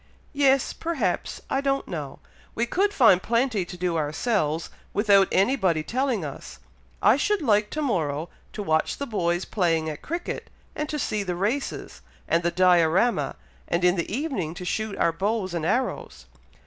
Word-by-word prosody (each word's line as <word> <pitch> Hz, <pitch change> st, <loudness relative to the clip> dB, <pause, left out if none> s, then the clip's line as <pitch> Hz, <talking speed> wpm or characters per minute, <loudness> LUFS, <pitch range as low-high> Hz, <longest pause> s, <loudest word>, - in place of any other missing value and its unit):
"Yes 275 Hz, -2 st, +3 dB
perhaps 270 Hz, -, -2 dB
I 270 Hz, -, 0 dB
don't 275 Hz, 0 st, 0 dB
know! 150 Hz, -6 st, -5 dB, 0.4 s
we 235 Hz, -, +1 dB
could 390 Hz, +11 st, +1 dB
find 230 Hz, -, +5 dB
plenty 230 Hz, -4 st, +1 dB
to 180 Hz, -, -9 dB
do 175 Hz, -1 st, -1 dB
ourselves, 155 Hz, +1 st, -1 dB, 0.2 s
without 200 Hz, -2 st, +5 dB
anybody 190 Hz, -, +2 dB
telling 250 Hz, -, -1 dB
us. 140 Hz, -, -8 dB, 0.5 s
I 235 Hz, -, +6 dB
should 405 Hz, +3 st, 0 dB
like 210 Hz, -4 st, +3 dB
to 305 Hz, -, -3 dB
morrow, 160 Hz, -, -1 dB, 0.2 s
to 210 Hz, -, -4 dB
watch 160 Hz, -4 st, +1 dB
the 280 Hz, -, -3 dB
boys 175 Hz, -6 st, -1 dB
playing 165 Hz, -5 st, 0 dB
at 150 Hz, -, -9 dB
cricket, 340 Hz, +3 st, -5 dB, 0.3 s
and 300 Hz, 0 st, -3 dB
to 300 Hz, -, -2 dB
see 215 Hz, -7 st, -1 dB
the 180 Hz, -3 st, -3 dB
races, 215 Hz, +10 st, -3 dB, 0.3 s
and 165 Hz, -, +2 dB
the 170 Hz, -, +1 dB
Diorama, 180 Hz, +5 st, +3 dB, 0.3 s
and 170 Hz, +1 st, 0 dB
in 180 Hz, 0 st, +4 dB
the 170 Hz, 0 st, -3 dB
evening 210 Hz, -, -2 dB
to 180 Hz, 0 st, -7 dB
shoot 215 Hz, +2 st, -2 dB
our 170 Hz, -, +3 dB
bows 190 Hz, +2 st, -1 dB
and 165 Hz, -2 st, -1 dB
arrows." 245 Hz, +6 st, -2 dB
200 Hz, 165 wpm, -25 LUFS, 170-255 Hz, 0.5 s, I